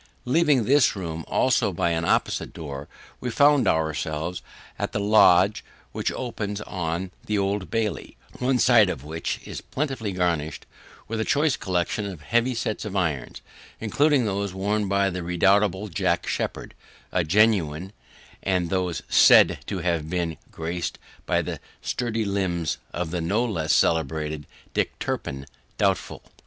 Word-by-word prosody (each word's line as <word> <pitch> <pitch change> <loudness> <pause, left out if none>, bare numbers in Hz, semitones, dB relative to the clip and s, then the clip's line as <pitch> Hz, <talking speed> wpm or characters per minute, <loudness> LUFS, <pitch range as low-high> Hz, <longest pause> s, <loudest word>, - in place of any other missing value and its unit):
Leaving 145 -2 +3
this 140 0 +4
room 85 -4 -5
also, - - +2
by 85 - 0
an 80 0 0
opposite - - 0
door, 70 -3 -7 0.3
we 125 - -3
found 140 -1 +4
ourself 80 +1 -1 0.4
in - - -1
the - - 0
lodge 100 -1 +5 0.3
which - - -1
opens 105 -5 -4
on 90 -1 -3 0.2
the 105 - 0
Old 100 -1 -1
Bailey; 110 -2 -2 0.2
one 130 +1 +2
side 115 -5 +5
of 65 - -4
which 80 +2 -3
is - - -6
plentifully 130 -7 -3
garnished 85 -4 -1 0.4
with 115 0 -3
a - - +2
choice 145 +4 +2
collection 95 +3 -1
of 90 -6 -8
heavy 120 - +1
sets 110 -2 -2
of 105 -2 -5
irons, 80 -9 -2 0.4
including 140 +4 +2
those 100 -2 -2
worn 100 +2 0
by 100 0 +2
the 90 0 -4
redoubtable 95 +3 +2
Jack 85 - 0
Sheppard - - -3 0.5
genuine; 95 -3 +2 0.5
and 90 -3 0
those 90 -3 -1
SAID - - +6
to 95 - -3
have 85 -3 -1
been 85 -2 -2
graced 85 +2 -4 0.3
by - - +2
the - - -5 0.2
sturdy 115 -2 -2
limbs 90 -6 -1
of 85 -2 -3
the 90 -1 -2
no 105 +9 +1
less 85 -9 -1
celebrated 75 -1 +1 0.3
Dick - - -1
Turpin 65 +1 -4 0.3
doubtful. - - 0
95 Hz, 145 wpm, -25 LUFS, 85-110 Hz, 0.5 s, SAID